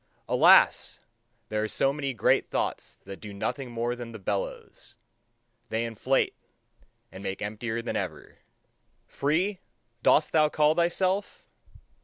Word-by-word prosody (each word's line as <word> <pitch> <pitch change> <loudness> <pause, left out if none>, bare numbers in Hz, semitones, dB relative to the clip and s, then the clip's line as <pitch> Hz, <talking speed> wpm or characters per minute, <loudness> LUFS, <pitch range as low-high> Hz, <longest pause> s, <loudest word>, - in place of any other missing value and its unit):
Alas! - - +5 0.5
there 105 0 -1
are 110 - -1
so 135 +5 +1
many 140 -2 -3
great 120 - +2
thoughts - - -3
that 95 - -9
do 105 - -8
nothing 125 +6 -4
more 120 +1 -2
than 120 -1 -8
the - - -6
bellows: 100 0 -5 0.7
they 115 +1 -1
inflate, 115 +4 0 0.8
and 95 - -10
make 95 -1 -4
emptier 110 +2 -4
than - - -3
ever. - - -5 0.7
Free, 175 +8 0 0.4
dost 150 - +4
thou 155 -1 +4
call 150 0 +3
thyself? 185 +4 0
120 Hz, 130 wpm, -27 LUFS, 110-150 Hz, 0.8 s, Alas